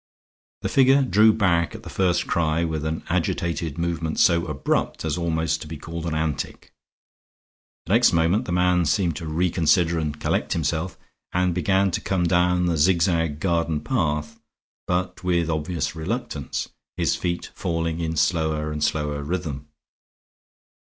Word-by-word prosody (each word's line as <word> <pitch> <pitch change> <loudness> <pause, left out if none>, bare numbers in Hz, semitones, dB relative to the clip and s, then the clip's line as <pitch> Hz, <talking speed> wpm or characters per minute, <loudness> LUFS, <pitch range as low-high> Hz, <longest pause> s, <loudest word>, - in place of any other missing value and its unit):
The - - -1
figure 135 +1 +5
drew 110 -3 +5
back 90 -6 +1
at - - -10
the - - -10
first 90 -2 +1
cry, 80 0 +1
with 80 -2 -2
an 80 +1 -3
agitated 85 -3 -1
movement 85 -2 -2
so 85 0 +3
abrupt 75 +1 -1
as 75 -2 0
almost 80 -2 -1
to - - -7
be 80 0 -6
called 85 +2 -6
an 80 - -2
antic. 80 -3 -3 1.1
The 90 - -1
next 120 +2 +5
moment 85 +7 +2
the - - -4
man 90 -1 +2
seemed 85 -2 +1
to 80 - -6
reconsider 85 +1 +2
and 75 -1 -3
collect - - 0
himself, 85 +2 -2 0.4
and 90 0 +2
began 95 +2 +2
to - - -2
come 95 -2 0
down 90 +1 +2
the 85 -2 +1
zigzag 80 -2 +2
garden 85 -3 0
path, 75 0 -1 0.5
but 90 +1 -2
with 85 -2 +1
obvious 80 -1 -2
reluctance, 80 - -4 0.3
his - - +1
feet 85 -1 -3
falling 85 -1 -2
in 80 -1 -2
slower 80 -1 +1
and 75 0 -3
slower 75 -2 -1
rhythm. 75 -3 -4
85 Hz, 150 wpm, -24 LUFS, 80-90 Hz, 1.1 s, figure